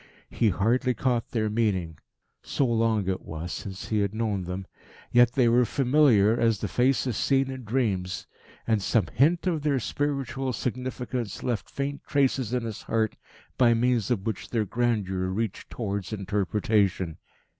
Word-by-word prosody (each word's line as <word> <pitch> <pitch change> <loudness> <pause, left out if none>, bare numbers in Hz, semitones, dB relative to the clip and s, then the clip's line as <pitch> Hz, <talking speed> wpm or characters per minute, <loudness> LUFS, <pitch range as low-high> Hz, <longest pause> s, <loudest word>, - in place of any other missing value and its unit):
He 115 - +2
hardly 120 +7 +1
caught 120 0 0
their 110 -2 0
meaning, 100 -8 -1 0.4
so 140 - 0
long 115 -4 +1
it 95 -1 -1
was 80 +2 -6
since, 95 -2 -6
he 110 - +1
had 100 +1 -1
known 105 -5 -1
them; 90 +2 -5 0.5
yet 120 0 +5
they 125 -3 +3
were 120 +2 +5
familiar 125 -4 +3
as 115 -2 +3
the - - -3
faces 125 -1 +1
seen 135 +2 +1
in 130 -2 -7
dreams, 100 -6 -1 0.4
and 110 -3 +1
some 105 +1 +2
hint 165 +8 +3
of 170 -5 0
their 145 -2 +1
spiritual 135 0 -2
significance 125 -2 -4
left 120 -4 -2
faint 140 0 -3
traces 135 -4 +1
in 125 -1 0
his 110 -2 -5
heart 110 -1 0 0.4
by 120 -2 +5
means 120 -1 +1
of 110 -6 0
which 110 -4 -3
their 115 -3 0
grandeur 100 -5 0
reached 100 +2 -3
towards 100 -5 -4
interpretation. 100 -3 0
115 Hz, 155 wpm, -27 LUFS, 100-125 Hz, 0.5 s, yet